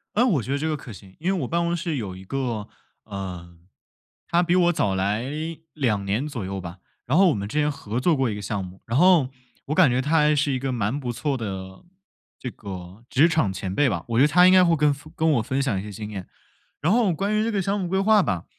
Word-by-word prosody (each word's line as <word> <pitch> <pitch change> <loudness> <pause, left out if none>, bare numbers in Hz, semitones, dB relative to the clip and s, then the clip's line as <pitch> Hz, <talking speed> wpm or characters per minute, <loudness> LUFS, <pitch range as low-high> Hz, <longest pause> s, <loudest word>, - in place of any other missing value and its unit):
呃， 240 +4 +4
我 160 - +2
觉 120 - -7
得 140 - +1
这 160 +2 -1
个 155 - -1
可 125 -5 -10
行， 95 -1 -14
因 180 +4 0
为 185 -6 -1
我 125 - -3
办 170 +1 0
公 170 0 0
室 165 -3 -3
有 100 -6 -5
一 95 - -11
个， 120 -3 -3 0.4
呃 90 -4 -7 0.8
他 175 - +4
比 175 - +2
我 175 -1 +4
早 100 - 0
来 100 +4 0 0.5
2 115 -9 0
年 105 +9 -1
左 115 -9 -5
右 95 +1 -4
吧， 90 0 -8 0.3
然 135 - +1
后 190 -1 +6
我 - - +1
们 100 -1 -4
之 150 - -2
前 150 - +2
合 115 -5 -4
作 165 +3 +3
过 135 -3 +1
一 105 - -3
个 105 - -6
项 100 -1 -3
目， 90 +1 -11
然 115 - -1
后 175 -6 +5 0.4
我 150 - -1
感 165 -6 +5
觉 125 +1 +1
他 150 +4 -2
还 150 0 +4
是 145 -1 +1
一 130 - 0
个 135 +1 -2
蛮 115 +2 -1
不 125 - -3
错 140 +3 -2
的 95 -5 -6 0.6
这 130 - -5
个 95 +1 -9
职 145 +6 +4
场 160 - +1
前 95 0 -4
辈 145 +2 +3
吧， 85 -6 -2
我 115 - 0
觉 - - +6
得 145 - +5
他 180 +4 +6
应 185 - +7
该 185 -1 +7
会 170 -1 +3
跟 145 -1 +3 0.2
跟 160 - +2
我 120 - +2
分 130 +4 -2
享 125 -8 0
一 95 - -4
些 105 - -8
经 105 +2 -7
验。 95 -3 -7 0.5
然 170 - +2
后 225 -5 +3
关 200 +6 -1
于 215 - +2
这 230 - 0
个 200 - 0
项 195 +3 -1
目 180 - -2
规 190 - 0
划 210 0 +5
吧， 90 - -2
130 Hz, 285 characters per minute, -24 LUFS, 100-165 Hz, 0.8 s, 应